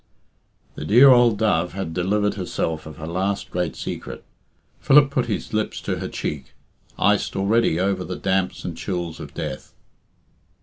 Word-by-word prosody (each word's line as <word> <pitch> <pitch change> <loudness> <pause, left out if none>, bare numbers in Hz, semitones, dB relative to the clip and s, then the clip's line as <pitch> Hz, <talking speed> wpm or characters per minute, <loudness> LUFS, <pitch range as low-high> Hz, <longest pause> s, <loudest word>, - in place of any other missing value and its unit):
_" - - -36
The - - -6
dear 120 - +7
old 120 -4 +5
dove 90 -6 +1
had 95 -4 -4
delivered 105 +4 0
herself 80 -4 -3
of 80 -1 -10
her 80 - -7
last 95 +4 -2
great 90 -3 -2
secret. - - -6 0.6
Philip 140 0 +5
put 130 -3 0
his 105 -1 -4
lips 110 0 -1
to - - -2
her - - -4
cheek, 70 -3 -5 0.4
iced - - +1
already 100 -3 +2
over 95 0 0
the 90 - -5
damps 95 -1 -1
and 85 - -4
chills 85 -2 -4
of - - -10
death. 65 - -6
95 Hz, 165 wpm, -22 LUFS, 85-105 Hz, 0.6 s, dear